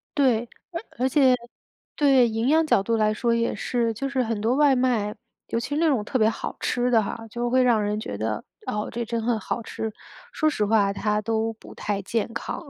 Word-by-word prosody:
对， 240 -5 +2 0.2
而 335 +1 -4 0.2
而 260 +1 +2
且 265 -3 +5 0.6
对， 270 -4 +5
营 225 +1 -1
养 320 +3 +4
角 200 - +3
度 230 +3 0
来 215 -1 +2
说 235 +2 +1
也 230 0 0
是 235 -2 -1
就 265 +6 -3
是 270 -2 0
很 225 -2 -2
多 225 +4 +1
外 290 -1 +5
卖， 240 -5 +1 0.3
尤 230 - -1
其 290 +5 -3
那 320 +2 +2
种 250 -8 +1
特 260 - -1
别 220 -2 +4
好 - - -5
吃 245 0 0
的 225 -3 +4
哈， 225 +2 -6
就 240 +2 -2
会 255 +1 +4
让 235 -4 +3
人 210 +1 -1
觉 100 - -5
得， 110 0 -2 0.2
哦， 210 0 -2
这 235 0 -3
真 230 0 -2
很 230 0 +1
好 215 - -3
吃， 220 0 -5 0.4
说 310 - +1
实 215 -8 0
话 205 -2 +3
它 210 +1 0
都 225 +1 0
不 - - -13
太 205 -1 -2
健 225 +3 -2
康。 230 - -4
230 Hz, 235 characters per minute, -25 LUFS, 215-255 Hz, 0.6 s, 且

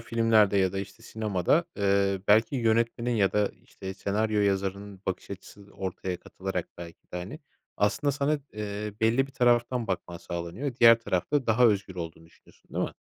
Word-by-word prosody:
filmlerde 115 -3 +3
ya 95 -2 +2
da, 95 - -3
işte, 100 +3 -8
sinemada, 110 - 0
eee, 100 -1 +2
belki 115 +7 +4
yönetmenin 115 +1 +1
ya 100 -3 +2
da, 105 -1 +2
işte, 95 0 -8
senaryo 105 +2 0
yazarının 100 0 -1
bakış 95 - -4
açısı 100 +1 -10
ortaya 95 -1 -4
katılarak 95 -2 -5
belki 85 -1 -10
de, - - -3
hani, 95 +12 -6 0.4
aslında 105 +8 +1
sana, 145 +2 0
eee, 105 0 -4
belli 115 +4 +3
bir 135 - -17
taraftan 120 -1 +2
bakman 90 -2 -3
sağlanıyor. 85 +10 -5
Diğer 115 -1 +8
tarafta 115 +6 -1
daha 120 +2 +5
özgür 100 -4 0
olduğunu 80 -2 -7
düşünüyorsun, 80 - -24
değil - - +1
mi? - - -6
105 Hz, 165 wpm, -28 LUFS, 95-115 Hz, 0.4 s, Diğer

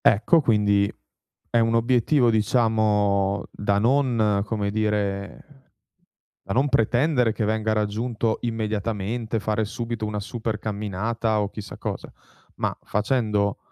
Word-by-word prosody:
Ecco, 120 - +5
quindi, 105 -4 +2 0.6
è 120 - +2
un 115 0 +2
obiettivo, 120 +3 +3
diciamo, 105 -3 +2
da 100 -1 0
non, 115 -4 +2
come 105 -2 -2
dire 105 +5 -3 0.8
da 95 - -3
non 130 +5 +2
pretendere 125 0 +2
che 110 - -2
venga 110 0 0
raggiunto 110 +2 -1
immediatamente, 110 0 -2
fare 110 +1 0
subito 115 0 -4
una 105 -1 -3
super 110 0 -4
camminata, 110 +2 -2
o 100 - -2
chissà 105 -2 -8
cosa, - - -5 0.4
ma - - -2
facendo 105 -2 0
110 Hz, 120 wpm, -24 LUFS, 105-115 Hz, 0.8 s, Ecco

